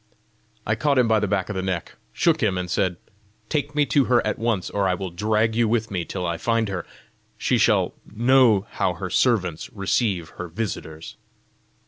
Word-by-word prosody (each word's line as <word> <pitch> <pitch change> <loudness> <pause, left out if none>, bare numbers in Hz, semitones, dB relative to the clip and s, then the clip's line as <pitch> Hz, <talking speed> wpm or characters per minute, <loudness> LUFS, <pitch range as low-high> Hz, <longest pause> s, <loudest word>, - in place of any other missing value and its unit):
I - - +1
caught 145 -2 +1
him 125 -2 +4
by 110 -1 +3
the 105 - -1
back 95 -2 0
of 105 - -4
the 95 - -1
neck, 95 -3 -3 0.2
shook 165 -2 +2
him, 100 -4 +1
and 90 -1 -4
said, 90 -3 0 0.5
"Take 145 -1 -2
me 150 -1 +3
to 140 -2 +4
her 120 -2 +2
at 110 - -1
once, 115 -5 -1
or 100 -1 +1
I 90 - +1
will 95 -1 -5
drag 110 +4 +1
you 115 -1 +3
with 110 -1 0
me 90 -3 -2
till 90 -2 -4
I 85 -1 -1
find 115 +2 0
her. 95 -3 -4 0.5
She - - +1
shall - - +3 0.2
know 120 -3 +4
how 90 - 0
her 95 0 -5
servants 90 -9 +1
receive 100 -4 -1
her 90 - -4
visitors." 80 -4 -6
100 Hz, 195 wpm, -23 LUFS, 90-115 Hz, 0.5 s, him